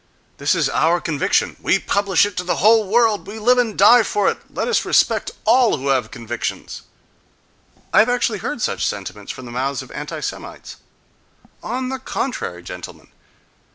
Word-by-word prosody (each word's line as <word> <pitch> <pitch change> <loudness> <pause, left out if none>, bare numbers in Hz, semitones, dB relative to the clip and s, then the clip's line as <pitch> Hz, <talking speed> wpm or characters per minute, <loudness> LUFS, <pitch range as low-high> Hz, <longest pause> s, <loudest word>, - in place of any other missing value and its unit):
—"This - - +2
is - - +1
our 165 +3 +2
conviction: 155 -4 0
we - - +3
publish 200 -2 +2
it 205 -2 -6
to 180 - -1
the 180 - -1
whole 220 +1 +4
world; 220 0 +2
we 210 +2 -7
live 245 +3 +3
and 225 -4 -1
die 235 +5 +7
for 205 -2 0
it—let - - -5
us 480 - +1
respect - - +2 0.2
all 235 +1 +4
who 140 +1 -3
have 130 -5 +1
convictions!"—I 115 - -6
have 220 +3 +5
actually 240 -4 0
heard 235 +5 -4
such - - -1
sentiments 100 0 -4
from 130 - -10
the 120 - -9
mouths 130 +2 -2
of - - -15
anti - - -6
Semites. - - -7 0.8
On 255 +2 -3
the 265 0 -4
contrary, 160 - -4
gentlemen! 90 0 -10
205 Hz, 165 wpm, -20 LUFS, -, 0.8 s, die